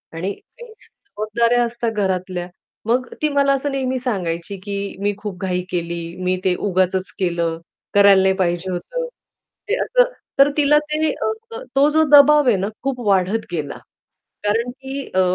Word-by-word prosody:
आणि 185 +4 -2
काही 480 - -15
जबाबदाऱ्या 235 - -1
असतात 235 -1 -2
घरातल्या. 185 -3 -2 0.4
मग 245 +2 +1
ती 305 - +2
मला 280 -1 +3
असं 275 +1 -1
नेहमी 260 -1 -1
सांगायची 190 -6 -3
की 200 -1 -4
"मी 205 0 +1
खूप 200 -3 -7
घाई 180 -1 -1
केली, 170 -1 -2 0.2
मी 185 0 +1
ते 185 -1 +2
उगाचच 185 0 0
केलं, 170 -3 0 0.4
करायला" 200 -1 +6
"नाही 190 0 +3
पाहिजे 180 0 -1
होतं." - - -4 0.6
हे 445 - +2
असं - - +3 0.3
तर 275 +1 +7
तिला 295 0 +5
ते 310 +1 +1
अ, 450 +1 -4 0.2
तो 280 +2 +5
जो 315 +1 +3
दबाव 295 0 +7
आहे 240 - +5
ना 195 +2 -1 0.2
खूप 270 -2 -2
वाढत 195 +3 +2
गेला. 155 -4 -4 0.7
कारण 225 +4 0
की 270 +1 -7
अ, 185 - +5
215 Hz, 160 wpm, -20 LUFS, 185-275 Hz, 0.7 s, तर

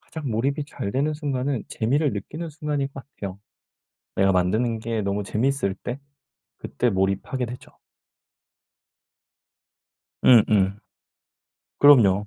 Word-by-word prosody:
가장 155 -5 -6
몰입이 140 +6 0
잘 100 -8 -5
되는 145 +3 +1
순간은 140 -4 -2
재미를 140 +6 0
느끼는 155 - -5
순간인 145 -2 -2
것 135 - -8
같아요. 100 -1 -6 0.8
내가 95 0 +4
만드는 110 +6 +1
게 115 0 -2
너무 100 +1 -1
재밌을 110 -3 0
때 120 +5 -6 0.6
그때 120 - -1
몰입하게 100 +6 -1
되죠. 125 +2 -10 2.5
음음. 105 -4 +5 1.0
그럼요. 105 -9 +6
120 Hz, 240 characters per minute, -24 LUFS, 100-140 Hz, 2.5 s, 그럼요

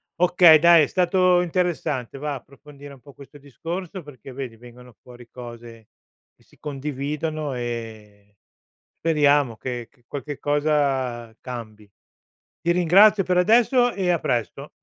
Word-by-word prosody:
Okay, 175 -3 +6
dai, 170 -1 +6
è - - 0
stato 180 0 +2
interessante, 165 -8 -2
va, 145 0 -4
approfondire 140 +1 -13
un 130 - -17
po' 140 - -15
questo 140 +2 -15
discorso 170 - -7
perché 140 -3 -13
vedi 130 -3 -7
vengono 125 +1 -15
fuori 120 -1 -15
cose 120 -2 -12 0.5
che - - -30
si - - -26
condividono 150 +1 -4
e 110 -4 -8 0.6
speriamo 145 -7 +2
che 120 0 -6
che 120 -4 -33
qualche 145 0 -7
cosa 135 -6 -1
cambi. 110 -4 -9 0.7
Ti 170 - +2
ringrazio 195 +4 +5
per 180 0 -1
adesso 240 +5 +3
e 185 -2 -2
a 170 - +2
presto. 130 +3 -3
140 Hz, 135 wpm, -23 LUFS, 120-170 Hz, 0.7 s, Okay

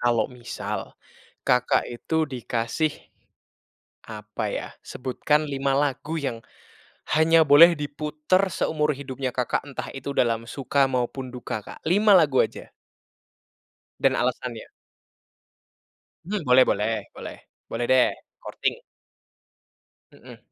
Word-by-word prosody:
Kalau 120 -2 +2
misal 120 -1 -6 0.5
Kakak 125 0 +2
itu 160 +7 -1
dikasih, 125 +2 -2 1.2
apa 105 -1 -6
ya, - - -3 0.2
sebutkan 150 +4 0
5 135 0 -1
lagu 145 +3 -1
yang 115 -5 -3 0.8
hanya 160 +1 +5
boleh 165 +5 +9
diputar 150 +6 0
seumur 150 -1 0
hidupnya 130 -1 -4
Kakak, 125 +1 -1
entah 135 - -6
itu 140 +1 -5
dalam 115 -1 +1
suka 140 0 +1
maupun 130 +1 -2
duka, 110 -4 -5
Kak? - - -11
5 205 +3 +4
lagu 145 -6 +4
aja. - - -9 1.3
Dan - - +3
alasannya. - - -2 1.6
Hmm, 205 +1 -2
boleh 125 +1 +7
boleh, 110 +2 +1 0.2
boleh - - -8 0.3
boleh 120 +1 -2
deh, 130 -1 +5 0.3
korting. - - -2 1.3
Mhm. - - -14
135 Hz, 110 wpm, -25 LUFS, 120-155 Hz, 1.6 s, boleh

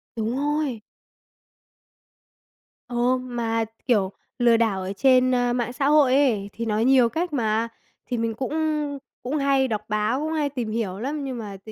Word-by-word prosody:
Đúng 225 +2 -2
rồi! 290 -4 -1 2.1
Ồ! 245 +1 +1
Mà, 235 -3 -2 0.2
kiểu, 200 -6 +2 0.3
lừa 235 -2 +4
đảo 220 -5 +1
ở 190 +1 -4
trên, 255 +2 +4
ơ, 245 -1 +1
mạng 245 0 -2
xã 275 +2 -1
hội 290 -3 +5
ấy 225 -8 +2
thì 230 +1 -4
nói 215 +1 +1
nhiều 255 -3 +5
cách 335 +3 -2
mà, 225 -3 +1 0.4
thì 245 - -3
mình 230 0 -1
cũng 260 +6 -4 0.7
cũng 275 +5 -1
hay 275 -1 +2
đọc 215 -4 -2
báo, 215 +4 0
cũng 310 +2 -2
hay 300 -2 0
tìm 245 -6 -4
hiểu 210 -4 -2
lắm 285 +5 -3
nhưng 260 -3 -4
mà 205 -3 -7
tự 220 - -9
245 Hz, 175 wpm, -24 LUFS, 225-270 Hz, 2.1 s, hội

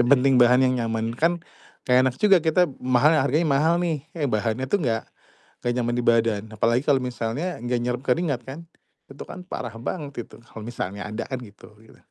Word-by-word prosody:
Yang 120 - +3
penting 135 +1 +3
bahan 125 +1 +6
yang 130 - +2
nyaman, 115 0 -2
kan 165 +8 +1 0.5
gak 125 0 +6
enak 130 -1 +1
juga 205 -2 +6
kita 165 +3 +4 0.2
mahal 130 +4 +3
harganya 145 +3 +2
mahal 150 +4 +3
nih, 160 -5 -2
eh 155 - -1
bahannya 110 +3 -1
tuh 200 - +1
gak 115 -3 0 0.6
gak 120 - +1
nyaman 120 -1 0
di 125 - -1
badan. 115 -3 +2
Apalagi 115 +4 +1
kalau 140 -3 +4
misalnya 125 +8 -3
gak 120 0 0
nyerep 125 +1 -2
keringat 140 -1 0
kan, 140 +7 -8 0.5
itu 135 - -9
kan - - -8
parah 150 -9 -6
banget 140 -3 -5
itu - - -15
kalau 115 -2 -11
misalnya 105 -3 -5
ada 110 +2 -4
kan 130 -1 -4
gitu 110 -1 -14
gitu 110 - -19
ya. - - -32
125 Hz, 205 wpm, -24 LUFS, 115-145 Hz, 0.6 s, bahan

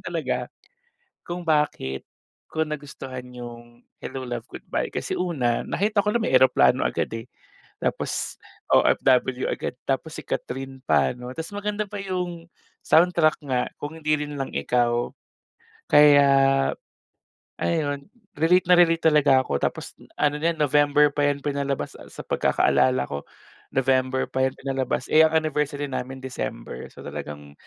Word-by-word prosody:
talaga - - -2 0.8
kung 175 +1 -4
bakit 150 - 0 0.4
ko 160 - -1
nagustuhan 140 -4 -7
yung 120 0 -10 0.2
Hello, 130 - -6
Love, 120 -2 -5
Goodbye, - - -4
kasi - - -3
una, 135 -10 0
nakita 210 +1 +1
ko 210 +1 -1
na 230 - 0
may - - -1
eroplano 130 - +5
agad, - - -2
eh, 115 0 -6 0.5
tapos - - -2 0.4
OFW 130 0 +3
agad. - - -3 0.2
Tapos 145 +4 -1
si - - -5
Kathryn 135 +1 -5
pa 75 -4 +2
'no, 125 0 -8
ta's 160 +4 -6
maganda 210 +1 -2
pa 205 - -7
yung 180 -3 -4 0.3
soundtrack 165 -1 +4
nga, 125 -1 +1 0.2
"Kung 145 +2 -6
Hindi 155 -1 -1
Rin 145 - -7
Lang 135 -1 -4
Ikaw". 120 -1 +1 0.8
Kaya 145 -1 +7 1.3
ayun, 145 -4 -1 0.3
relate 180 +3 +4
na 180 - +7
relate 165 -1 +4
talaga 140 -3 +5
ako. 70 - -1
Tapos - - -3 0.2
ano 145 -1 +2
na 160 - 0
yan, - - -17
November 145 0 +4
pa 145 0 +1
yan 140 0 -2
pinalabas 140 -1 -2
sa - - -12
sa - - -9
pagkakaalala 125 - +2
ko, 70 0 -5 0.5
November 130 0 +2
pa 130 0 +1
yan 130 - -10
pinalabas, 135 -2 -2
eh, 155 - +7
ang 160 0 0
anniversary 150 -2 0
namin 130 0 -5
December, - - -6
so - - -13
talagang 75 -1 -7
140 Hz, 145 wpm, -24 LUFS, 125-160 Hz, 1.3 s, Kaya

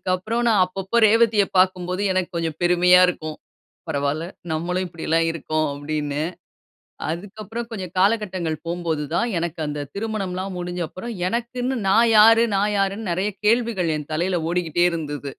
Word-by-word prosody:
அதுக்கு - - -8
அப்புறம் 225 +6 -2
நான் 210 -5 +4
அப்பப்போ 190 +4 -4
ரேவதிய 220 -1 +4
பாக்கும்போது, 185 0 +1
எனக்கு 185 -1 -1
கொஞ்சம் 165 -2 -2
பெருமையா 180 +1 +5
இருக்கும். 155 -3 -4 0.5
"பரவால்ல, 145 +3 -1 0.3
நம்மளும் 180 +4 -1
இப்படியெல்லாம் 165 0 0
இருக்கோம்" 155 0 -1
அப்படின்னு. 145 0 -3 0.9
அதுக்கு 190 +6 -6
அப்புறம் 230 +3 -5
கொஞ்சம் 185 -5 -6
காலகட்டங்கள் 190 -5 +1
போம்போது 170 -3 -2
தான், 235 - +1
எனக்கு 170 -1 -4
அந்த 145 -1 -4
திருமணம்லாம் 195 -3 -3
முடிஞ்ச 175 0 -4
அப்புறம். 235 +5 -7 0.2
எனக்குன்னு 245 +3 -2
"நான் 230 +4 +5
யாரு? 225 +2 +7
நான் 205 +1 +1
யாருன்னு?" 195 +1 -1
நெறைய 190 +5 0
கேள்விகள் 220 -6 +2
என் 150 0 -8
தலையில 175 +3 0
ஓடிக்கிட்டே 175 -1 +1
இருந்தது. 145 -4 -4
180 Hz, 145 wpm, -22 LUFS, 165-210 Hz, 0.9 s, யாரு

